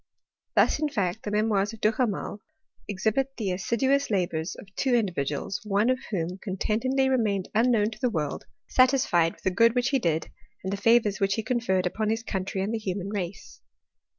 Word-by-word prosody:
Thus - - +4
in 305 -1 0
fact 205 -6 -1
the - - -4
memoirs 210 0 +1
of 225 - -10
Duhamel 215 -2 0 0.5
exhibit 220 +7 -1
the 210 -4 -2
assi 190 +6 -1
duous 275 +3 +2
labours 175 -5 -1
of 195 -1 -13
two 260 -3 +2
individuals, 175 - -1
one 210 +3 +2
of 255 - 0
whom 180 -2 -3
con 190 -2 -4
tentedly 260 +7 +1
remained 215 -8 0
unknown 225 -1 +3
to - - -10
the 250 - +1
world, 155 -9 -3 0.2
satisfied 250 -11 +3
with - - -24
the 190 - +1
good 230 +5 +4
which 245 +1 +2
he 275 - +2
did, 165 -6 -1 0.3
and 190 +1 -2
the 200 - -4
favours 225 -3 +4
which 195 -1 +2
he 220 - -2
conferred 220 -6 0
upon 215 +4 -1
his 225 +1 -1
country 190 -2 -3
and 210 +3 -2
the 225 - -1
human 195 -2 -3
race. 195 -2 -6
210 Hz, 190 wpm, -27 LUFS, 190-235 Hz, 0.5 s, Thus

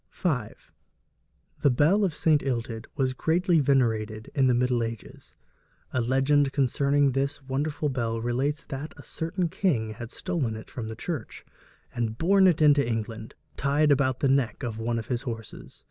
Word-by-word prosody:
V. 180 - -1 1.3
The 145 - +5
bell 155 +11 +3
of 180 -6 0
St. 155 -2 +3
Illtyd 115 -3 -3
was 130 -2 0
greatly 170 +5 +2
venerated 110 -6 0
in 135 -2 +3
the 125 - +3
middle 125 0 +1
ages. 115 -2 -7 0.6
A 130 - +1
legend 135 +3 +2
concerning 140 +1 +2
this 140 +2 -2
wonderful 145 +3 -2
bell 115 -4 -2
relates 130 +6 -1
that 145 +3 -7
a - - -11
certain 170 +2 -2
king 135 - 0
had 115 +1 -8
stolen 155 -12 -2
it 110 - -10
from 115 -3 -5
the 110 - -6
church, 145 0 -6 0.5
and 115 -2 -2
borne 190 +5 +4
it 165 -3 +3
into 145 -1 +6
England, 115 -1 -4 0.2
tied 145 +2 +2
about 130 -2 +2
the 140 - +3
neck 135 -1 +1
of 115 -3 -4
one 115 +1 -1
of 115 - -4
his 120 0 -2
horses. 115 -4 -8
135 Hz, 165 wpm, -27 LUFS, 115-145 Hz, 1.3 s, into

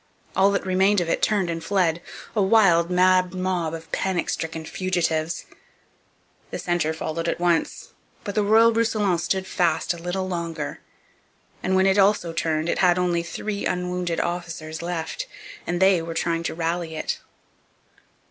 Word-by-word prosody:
All 195 +1 +5
that 200 -1 -1
remained 190 +2 +3
of 170 -2 -2
it - - 0
turned 205 -4 +2
and 165 -1 -3
fled, 175 -4 +1 0.3
a 210 - +3
wild, 190 -5 +4
mad 185 0 +3
mob 180 -3 -1
of 165 -1 -11
panic 190 -3 -1
stricken 160 0 -4
fugitives. 165 -3 -1 1.0
The - - -4
centre 175 -3 0
followed 160 +1 -3
at - - -2
once. 175 -2 0 0.3
But 205 - -4
the 210 - +2
Royal 225 +3 +5
Roussillon 215 -5 +1
stood 190 +2 -1
fast 175 -2 +1
a 170 - -10
little 185 +2 -2
longer; 170 -4 -4 0.8
and 190 +1 0
when 190 0 +4
it 195 +1 +4
also 195 -4 +3
turned 160 -1 -1
it - - 0
had 180 -1 +4
only 175 -1 +1
three 200 +5 -3
unwounded 180 -1 -2
officers 165 -2 -4
left, 175 - -4 0.4
and 175 0 -1
they 190 -2 +5
were 165 0 -6
trying 165 0 0
to - - -2
rally 165 0 -2
it. 155 - -3
175 Hz, 160 wpm, -24 LUFS, 165-190 Hz, 1.0 s, All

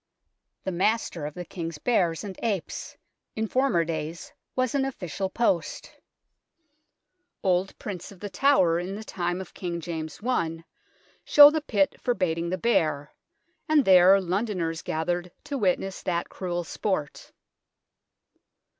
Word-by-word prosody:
" - - -56
The 190 - -1
Master 185 -4 0
of 150 - -9
the 180 - -6
King's 165 -3 -6
Bears 175 -3 +1
and 195 -2 -6
Apes 205 -7 -3 0.2
" - - -57
in 220 - -1
former 255 -9 +2
days 160 0 -5 0.2
was 255 -2 0
an 280 -1 +2
official 195 - -3
post. 190 -5 -1 1.5
Old 185 0 +1
prints 185 -3 -7
of 195 - -14
The 205 - -5
Tower 185 -12 +3
in 185 +3 -4
the 215 - -7
time 175 -3 -2
of 190 - -8
King 175 -2 -4
James 160 -2 -5
I 165 -10 -1 0.6
show 290 0 +9
the 315 0 -1
pit 200 -9 0
for 245 - +1
baiting 170 -2 -1
the 185 - -1
bear, 155 -8 +1 0.6
and 300 -4 +4
there 190 +1 +7
Londoners 180 -3 -2
gathered 175 +2 -2
to 285 - -5
witness 190 -1 0
that 170 -1 -2
cruel 175 -2 -3
sport. 165 -4 -3
180 Hz, 145 wpm, -26 LUFS, 170-215 Hz, 1.5 s, show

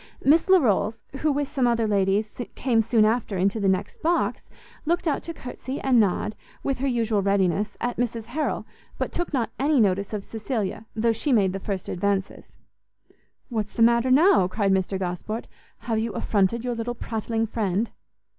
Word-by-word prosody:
Miss 315 +6 +4
Larolles, 225 - +3 0.2
who 305 +2 +1
with 285 0 -1
some 265 -3 +1
other 230 -2 +2
ladies 205 +1 +1 0.2
came 235 -4 +2
soon 225 -1 +3
after 220 -3 0
into 195 +4 +1
the 200 - +1
next 190 +1 -2
box, 340 +2 0 0.3
looked 345 +2 0
out 290 - +1
to 335 - -6
courtsie 260 -2 -6
and 260 -3 +4
nod, 210 0 +1 0.3
with 275 -2 -1
her 275 - 0
usual 225 -5 +1
readiness, 195 0 +1
at 245 0 -2
Mrs 235 -2 -1
Harrel, 295 +7 -2 0.3
but - - -2
took 350 - -3
not 255 -6 -1
any 285 +1 +3
notice 200 -2 +2
of 210 -2 -3
Cecilia, 220 -1 -4
though 230 +1 +2
she 225 +6 -1
made 200 -6 +3
the 195 - -3
first 195 -1 -4
advances. 195 +1 -2 1.0
"What's 215 -4 -3
the 230 - +4
matter 235 +2 +4
now?" 295 - +5
cried 195 +1 0
Mr 190 0 +1
Gosport; 190 +5 -4 0.4
"have 230 -1 -1
you 225 -1 -2
affronted 205 +4 +1
your 250 -1 -1
little 235 +1 -3
prattling 225 0 -2
friend?" 215 -1 -1
225 Hz, 175 wpm, -25 LUFS, 200-250 Hz, 1.0 s, now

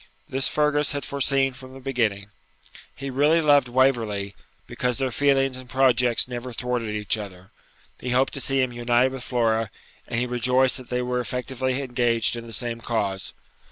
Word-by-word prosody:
This 135 +1 +1
Fergus 150 -1 +2
had 145 -2 -3
foreseen 135 -1 +1
from 130 0 -12
the - - -9
beginning. 110 -7 -1 0.6
He 135 0 -5
really 145 +5 +3
loved 145 -4 +4
Waverley, 115 -6 +1 0.3
because 125 -1 -2
their 135 -1 -1
feelings 135 0 +2
and 130 -1 -11
projects 125 -3 +3
never 125 0 -6
thwarted 125 -1 -2
each 105 +1 -1
other; 95 -3 -10 0.5
he 125 - -5
hoped 130 +2 +2
to 135 - -2
see 135 0 +2
him 130 -1 -1
united 120 +2 +2
with 130 -2 -7
Flora, 115 -4 0 0.4
and 120 - -1
he 125 - 0
rejoiced 125 +1 +2
that 130 -2 -10
they 125 0 -1
were 125 0 -1
effectually 125 +2 -2
engaged 120 -3 +1
in 115 0 -7
the - - -9
same 115 +2 -3
cause. 100 -5 -2
125 Hz, 175 wpm, -24 LUFS, 115-135 Hz, 0.6 s, loved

